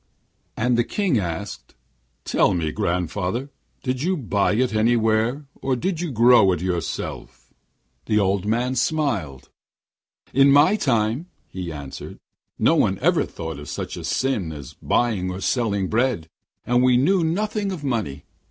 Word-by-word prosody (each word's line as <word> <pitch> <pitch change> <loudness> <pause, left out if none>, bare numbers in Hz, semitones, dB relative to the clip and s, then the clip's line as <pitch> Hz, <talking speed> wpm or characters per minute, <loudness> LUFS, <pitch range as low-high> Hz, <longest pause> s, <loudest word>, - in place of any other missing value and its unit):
And 120 +1 +1
the - - +4
King 185 - 0
asked: 90 +2 -5 0.5
'Tell - - +2
me, 80 -3 -1
grandfather, 90 - -2 0.3
did 130 0 -2
you 185 +4 0
buy 105 -7 +1
it 125 +2 +1
anywhere, 115 +4 +2 0.2
or 135 -1 0
did 170 +5 -2
you 175 -4 -3
grow 120 -4 +6
it 90 - -2
all - - -3
yourself?' 90 -3 -4 0.5
The 105 - +2
old 100 -1 +1
man 120 +4 0
smiled. 120 - -1 0.8
'In 135 +1 +6
my 145 +8 +6
time,' 120 - 0 0.2
he 90 -2 -5
answered, 70 -3 -8 0.4
'no - - +3
one - - +2
ever - - +2
thought 80 -3 -6
of 75 - -9
such - - -5
a - - -7
sin 120 -11 -1
as 70 -4 -9
buying 105 -7 +1
or 90 +1 -5
selling 100 -1 0
bread; 115 -7 0 0.4
and 120 0 +3
we 125 -1 +4
knew 170 +8 +3
nothing 205 +4 -1
of 175 -6 -6
money. 110 - -2
115 Hz, 150 wpm, -23 LUFS, 95-135 Hz, 0.8 s, grow